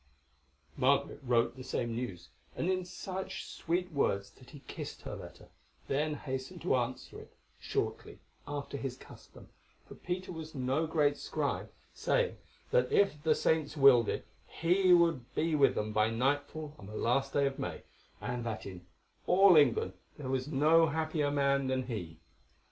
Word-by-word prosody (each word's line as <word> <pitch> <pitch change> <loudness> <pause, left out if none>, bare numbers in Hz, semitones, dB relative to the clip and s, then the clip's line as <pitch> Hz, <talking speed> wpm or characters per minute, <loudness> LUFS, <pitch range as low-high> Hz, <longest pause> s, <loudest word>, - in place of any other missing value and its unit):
Margaret 140 +2 +2
wrote 120 -2 +1
the 130 - -9
same 120 -2 -2
news, 115 -8 -5 0.3
and 180 - 0
in 185 -1 -1
such 190 +1 -5
sweet 180 +2 -2
words 100 -9 0
that 125 +4 -18
he 145 - -12
kissed - - -8
her - - -5
letter, - - -11 0.4
then 150 +2 0
hastened 135 +5 -6
to 175 - +2
answer 125 0 -3
it, - - -15 0.2
shortly, - - -3 0.3
after 145 -1 -4
his 135 -2 -4
custom, - - -15 0.4
for - - -10
Peter 180 +1 -4
was 160 -2 -8
no 135 +5 0
great 150 -3 +2
scribe, - - -3 0.2
saying, - - 0 0.3
that - - +3
if 195 -7 +3
the 155 0 +3
saints 155 -1 0
willed 130 -5 +7
it - - -3 0.2
he 180 +3 +2
would 165 -8 +3
be 160 +1 +1
with 140 -2 +4
them 105 0 -2
by 110 +1 +3
nightfall 145 +5 -1
on 100 - -10
the 105 - -9
last 135 +3 +1
day 140 - +3
of 135 0 -2
May, - - -4 0.4
and 125 -1 -3
that 110 -2 -4
in 90 -2 -9 0.4
all 190 0 +7
England 120 -10 +4 0.2
there 140 -4 -6
was 130 0 -1
no 155 +3 +4
happier 155 -1 0
man 140 -1 +2
than 130 0 0
he. 105 -10 -6
140 Hz, 165 wpm, -32 LUFS, 125-160 Hz, 0.4 s, willed